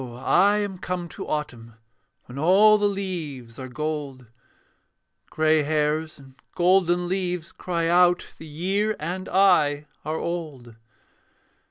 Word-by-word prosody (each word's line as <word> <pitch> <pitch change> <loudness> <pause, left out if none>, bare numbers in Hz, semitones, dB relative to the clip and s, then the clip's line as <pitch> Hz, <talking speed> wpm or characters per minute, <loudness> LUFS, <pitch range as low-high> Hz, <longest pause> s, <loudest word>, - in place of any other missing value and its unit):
I 130 +11 +2
am 200 -3 -3
come 180 -1 -4
to - - -8
autumn, 120 -7 -5 0.5
When 125 +3 -9
all 205 +7 +5
the 205 - +2
leaves 160 - -5
are 130 - -6
gold; 145 -2 -5 1.0
Grey 155 0 +2
hairs 155 +1 -1
and 135 -2 -16 0.2
golden 180 -1 +2
leaves 180 -2 -3
cry 170 -2 -3
out 175 +1 +4
The 160 - -10
year 195 +8 -1
and 180 +4 -5
I 155 -7 +3 0.2
are 155 +1 -3
old. 150 -10 -5
165 Hz, 125 wpm, -24 LUFS, 145-185 Hz, 1.0 s, all